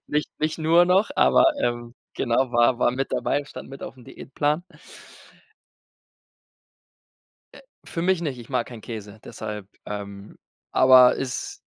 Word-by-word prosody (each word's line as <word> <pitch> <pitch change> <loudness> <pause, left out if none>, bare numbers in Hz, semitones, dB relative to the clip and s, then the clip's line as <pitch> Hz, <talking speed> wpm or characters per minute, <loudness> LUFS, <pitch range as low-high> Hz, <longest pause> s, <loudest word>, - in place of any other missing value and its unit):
Nich 150 0 -1
nicht 155 +2 -1
nur 165 +2 +4
noch, 185 +4 +2
aber, - - +5 0.2
ähm, 120 0 -2 0.2
genau, 125 +2 0
war 120 +1 +3
war 125 - +3
mit 130 +2 -3
dabei, 145 0 0
stand - - -10
mit 135 +1 -10
auf'm 125 -2 -9
Diätplan. 150 +7 -2 2.9
Äh, - - -14 0.2
für 165 - -5
mich 185 0 +1
nicht, 145 -6 -3
ich 120 - -12
mag 125 -3 -1
keinen 120 -3 -10
Käse, 110 -2 -8
deshalb, 105 -2 -7 0.2
ähm 100 -1 -8 0.4
aber 130 -1 +7
ist 130 -2 -5
130 Hz, 140 wpm, -24 LUFS, 115-150 Hz, 2.9 s, aber